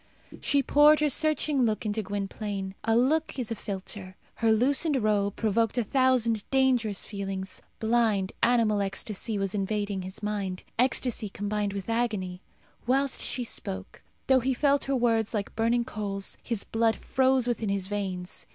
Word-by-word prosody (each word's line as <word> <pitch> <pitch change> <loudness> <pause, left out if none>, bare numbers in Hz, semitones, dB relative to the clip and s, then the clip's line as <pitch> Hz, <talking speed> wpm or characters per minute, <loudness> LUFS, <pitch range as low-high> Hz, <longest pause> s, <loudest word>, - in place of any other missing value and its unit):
She 280 -1 +2
poured 295 +3 +6
her 300 -1 +2
searching 305 -1 +2
look 220 -2 0
into 215 +1 -1
Gwynplaine. 200 -1 -4
A 225 - +2
look 295 +7 +2
is 240 -3 -3
a - - -1
philtre. 190 -2 -6 0.2
Her 225 -1 +3
loosened 275 +7 +3
robe 205 -2 +1
provoked 225 +2 +1
a 240 - +2
thousand 240 -3 +2
dangerous 250 -7 +2
feelings. 195 -2 -5 0.2
Blind, 220 -4 +2
animal 230 -4 +3
ecstasy 205 +2 -3
was 195 -1 -2
invading 205 -1 -2
his 190 +3 -8
mind 200 -3 -3 0.2
ecstasy 250 -3 +1
combined 205 0 -2
with 200 -2 -5
agony. 210 -6 -1 0.5
Whilst 270 +2 +2
she 250 - -1
spoke, 95 - -6 0.2
though 265 -1 +5
he 260 +1 0
felt 280 +2 +2
her 275 - 0
words 230 -3 +1
like 205 -1 -3
burning 235 +2 +1
coals, 200 -4 -4
his 230 -4 -3
blood 225 0 +1
froze 260 -1 +2
within 230 -3 -1
his 195 -1 0
veins. 190 -3 -3
220 Hz, 155 wpm, -27 LUFS, 200-250 Hz, 0.5 s, poured